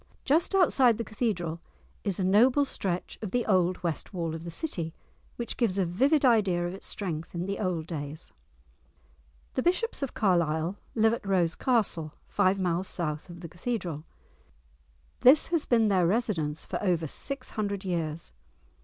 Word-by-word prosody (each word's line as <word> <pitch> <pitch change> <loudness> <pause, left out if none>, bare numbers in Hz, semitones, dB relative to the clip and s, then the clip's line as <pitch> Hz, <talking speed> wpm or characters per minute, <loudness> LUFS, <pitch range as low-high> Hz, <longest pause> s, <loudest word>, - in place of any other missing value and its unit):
Just 325 +7 +2
outside 265 - +4
the 230 - -2
Cathedral 190 -8 -2 0.4
is 200 -3 -1
a - - +1
noble 245 +9 +5
stretch 185 -8 -3
of 215 - -3
the 245 +3 0
old 185 -3 +2
West 170 +3 -3
Wall 165 -2 -2
of 160 0 -6
the 170 - -6
city, 170 - -3 0.4
which 235 - -5
gives 215 -6 +1
a 190 - +2
vivid 270 - +2
idea 200 -8 +3
of 175 - -3
its 195 - -9
strength 165 -4 -5
in 170 +1 -2
the 200 +1 -3
old 180 -5 -1
days. 155 -2 -6 1.2
The - - 0
bishops 365 - 0
of 275 - -3
Carlisle 170 -2 +1 0.2
live 225 0 +4
at 230 - -4
Rose 175 -4 +2
Castle, 195 - 0
five 185 +1 +2
miles 180 0 0
south 155 -1 -3
of 175 0 -10
the 170 - -6
Cathedral. 175 -4 -4 1.2
This 270 +4 +6
has 335 -3 0
been 230 -3 +4
their 185 -4 +3
residence 170 -8 -1
for - - -4
over 175 -4 +1
six 275 - -3
hundred 200 -2 -3
years. 165 -3 -3
185 Hz, 165 wpm, -28 LUFS, 170-230 Hz, 1.2 s, This